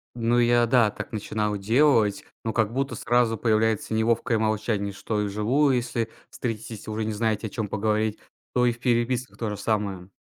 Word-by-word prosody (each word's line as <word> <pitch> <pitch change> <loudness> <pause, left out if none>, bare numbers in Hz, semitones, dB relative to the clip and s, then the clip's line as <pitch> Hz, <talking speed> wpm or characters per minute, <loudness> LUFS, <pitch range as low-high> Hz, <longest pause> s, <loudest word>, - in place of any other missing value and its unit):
Ну 120 +1 +1
я 120 0 +4
да, 115 -4 +4
так - - -7
начинал 105 -1 -2
делать, 110 -2 +3 0.2
но 110 - -1
как 110 -1 +1
будто 135 +3 -2
сразу 120 -1 +2
появляется 110 -1 +1
неловкое 115 0 +1
молчание, 110 -2 -1
что 105 +2 -3
и - - 0
вживую, 125 +8 +2
если 120 -2 -1 0.2
встретитесь 115 -2 -5
и - - -8
уже 110 +1 -2
не 110 0 -2
знаете, 110 0 -1
о - - -8
чём 105 +1 -3
поговорить, 110 +1 0 0.3
то 125 0 +3
и - - +4
в 120 - -8
переписках 125 +1 0
то 115 -2 -2
же 105 - -4
самое. 100 -4 -2
110 Hz, 185 wpm, -25 LUFS, 105-120 Hz, 0.3 s, я